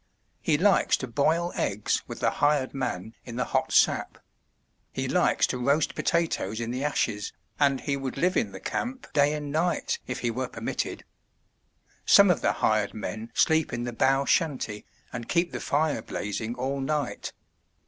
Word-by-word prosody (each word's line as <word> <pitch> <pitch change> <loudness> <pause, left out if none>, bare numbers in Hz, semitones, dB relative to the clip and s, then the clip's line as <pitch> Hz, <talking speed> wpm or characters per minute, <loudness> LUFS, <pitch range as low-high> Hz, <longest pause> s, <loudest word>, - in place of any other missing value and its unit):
He 150 - +2
likes 195 +4 +3
to 130 - -5
boil 160 +8 +1
eggs 100 +1 0
with - - -8
the - - +3
hired 145 -2 +1
man 115 -6 -3
in 120 - -8
the 125 - 0
hot - - 0
sap; - - +3 0.7
he - - -3
likes - - +3
to 125 - -3
roast 140 +5 +2
potatoes 160 - 0
in 115 0 -3
the 130 +3 -3
ashes, 105 -8 -1 0.3
and 140 -2 +3
he 140 - -1
would 135 -1 -4
live 180 +5 +2
in 235 - +1
the - - -8
camp 255 +2 -4
day 145 0 +4
and 150 -1 -5
night 170 +4 0
if 125 - -4
he 120 - 0
were 130 +2 -2
permitted. - - -4 1.0
Some - - +7
of - - 0
the - - +2
hired 105 -1 +1
men 110 +1 -5
sleep 160 -1 +3
in 120 0 -3
the 120 0 -4
bough 135 +4 +2
shanty 135 - 0 0.3
and 120 -2 -6
keep 170 0 +1
the - - -4
fire 150 +1 0
blazing 110 +3 -4
all 135 +2 -2
night. 145 -1 -2
135 Hz, 175 wpm, -27 LUFS, 120-155 Hz, 1.0 s, Some